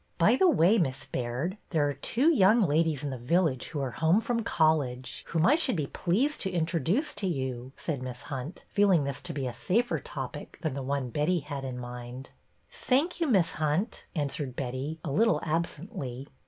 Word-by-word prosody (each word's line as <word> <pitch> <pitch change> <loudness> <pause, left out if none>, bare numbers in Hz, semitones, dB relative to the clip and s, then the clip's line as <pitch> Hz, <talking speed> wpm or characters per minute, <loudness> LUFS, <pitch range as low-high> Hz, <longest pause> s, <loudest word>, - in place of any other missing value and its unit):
" - - -42
By 230 - +6
the 370 +7 +5
way. 210 - +4
Miss 140 -5 -1
Baird, 130 - -3
there 155 -4 +2
are 145 - -1
two 250 - +2
young 215 -1 +5
ladies 155 -2 +1
in 145 - -2
the 130 - -5
village 150 +1 +1
who 155 - -4
are 130 -2 -2
home 160 - +3
from 230 +1 -1
college 150 - +1
whom 165 0 +1
I 275 - +6
should 300 -7 +2
be 155 -4 -1
pleased 230 - 0
to 190 - 0
introduce 175 - 0
to 205 -1 -2
you," 130 -5 -3
said 145 -6 -3
Miss 125 -1 -6
Hunt, 140 +3 -6
feeling 195 -6 +3
this 140 -1 -3
to 175 - -4
be 140 -4 -3
a 125 - -3
safer 235 - 0
topic - - -7
than 155 - 0
the 140 - -4
one 135 -2 -2
Betty 155 +6 +1
had 140 -1 -6
in 130 -2 -4
mind. 125 +1 -8 0.2
" - - -41
Thank 310 +7 0
you. 330 - +2
Miss 190 - +3
Hunt," 155 +8 -1
answered 140 -3 -2
Betty, 135 +5 -4
a 150 - -2
little 225 +11 +3
absently. 155 - -3
155 Hz, 200 wpm, -29 LUFS, 135-190 Hz, 0.2 s, By